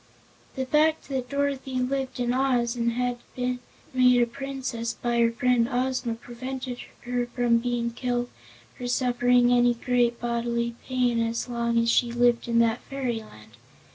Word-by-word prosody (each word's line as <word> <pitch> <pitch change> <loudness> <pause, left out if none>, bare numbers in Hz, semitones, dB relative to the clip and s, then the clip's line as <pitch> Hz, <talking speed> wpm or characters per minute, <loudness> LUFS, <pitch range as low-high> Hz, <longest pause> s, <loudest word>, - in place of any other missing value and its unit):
The 265 - -2
very 300 +4 +4
fact 310 - -22
that 260 -2 -3
Dorothy 280 -2 -1
lived 260 +1 -1
in 245 0 +1
Oz, 250 -2 +1
and 235 -1 0
had 245 0 -1 0.2
been 250 0 -1 0.3
made 250 -1 +5
a 240 - +5
Princess 255 -2 -4
by 240 -1 -1
her 230 0 +4
friend 240 0 +2
Ozma, 250 -2 -1
prevented 250 +2 -6 0.2
her 245 0 -2
from 240 -1 +2
being 235 -1 -1
killed 245 0 -2 0.5
or 245 - -4
suffering 245 -1 +3
any 245 0 +4
great 240 0 +1
bodily 235 0 -1
pain 250 -2 +1
as 230 +1 -1
long 235 -1 -1
as 230 0 +3
she 240 0 +2
lived 240 0 +2
in 235 -1 +1
that 230 0 +3
fairyland. 220 - -5
245 Hz, 160 wpm, -26 LUFS, 235-255 Hz, 0.5 s, made